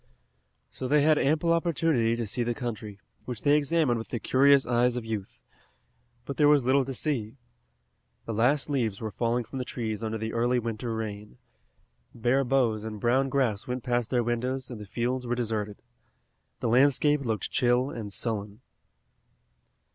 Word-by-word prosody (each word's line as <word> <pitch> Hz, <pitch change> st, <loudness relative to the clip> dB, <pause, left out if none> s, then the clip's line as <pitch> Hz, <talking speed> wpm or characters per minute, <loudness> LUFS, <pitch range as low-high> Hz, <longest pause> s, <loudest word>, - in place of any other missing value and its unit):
So 130 Hz, -, -6 dB
they 145 Hz, +2 st, +4 dB
had 155 Hz, 0 st, +4 dB
ample 160 Hz, +4 st, +2 dB
opportunity 160 Hz, -9 st, +1 dB
to 115 Hz, -1 st, -3 dB
see 110 Hz, +4 st, -2 dB
the 120 Hz, 0 st, -1 dB
country, 110 Hz, -5 st, -6 dB, 0.3 s
which 125 Hz, -3 st, -6 dB
they 145 Hz, 0 st, +5 dB
examined 150 Hz, -4 st, +2 dB
with 115 Hz, -, -7 dB
the 120 Hz, -, -3 dB
curious 140 Hz, +3 st, +4 dB
eyes 120 Hz, 0 st, +2 dB
of 120 Hz, -2 st, -4 dB
youth. 110 Hz, -4 st, -5 dB, 0.9 s
But 140 Hz, -, -6 dB
there 150 Hz, -, +5 dB
was 145 Hz, -2 st, +5 dB
little 135 Hz, +2 st, +3 dB
to 135 Hz, -, -4 dB
see. 125 Hz, -6 st, -2 dB, 0.9 s
The 115 Hz, -, -4 dB
last 125 Hz, +7 st, +2 dB
leaves 120 Hz, -9 st, -1 dB
were 110 Hz, -2 st, -4 dB
falling 120 Hz, +3 st, 0 dB
from 135 Hz, +3 st, -7 dB
the -, -, -1 dB
trees 110 Hz, -4 st, -4 dB
under 110 Hz, 0 st, -2 dB
the 110 Hz, 0 st, -4 dB
early 120 Hz, +2 st, +1 dB
winter 115 Hz, 0 st, -3 dB
rain. 105 Hz, -, -6 dB, 0.8 s
Bare 120 Hz, +4 st, +2 dB
boughs 120 Hz, -5 st, +1 dB
and 110 Hz, -1 st, -6 dB
brown 130 Hz, +5 st, +2 dB
grass 125 Hz, -7 st, 0 dB
went 125 Hz, -1 st, -3 dB
past 120 Hz, -2 st, 0 dB
their 120 Hz, -2 st, +1 dB
windows 125 Hz, +2 st, -2 dB
and 115 Hz, -3 st, -7 dB
the 105 Hz, -, -9 dB
fields 125 Hz, +4 st, -2 dB
were 120 Hz, -, 0 dB
deserted. 110 Hz, -4 st, -3 dB, 0.8 s
The -, -, 0 dB
landscape 140 Hz, +4 st, +4 dB
looked 115 Hz, -5 st, -2 dB
chill 125 Hz, +1 st, +2 dB
and 110 Hz, -4 st, -6 dB
sullen. 105 Hz, 0 st, -4 dB
120 Hz, 170 wpm, -27 LUFS, 110-135 Hz, 0.9 s, they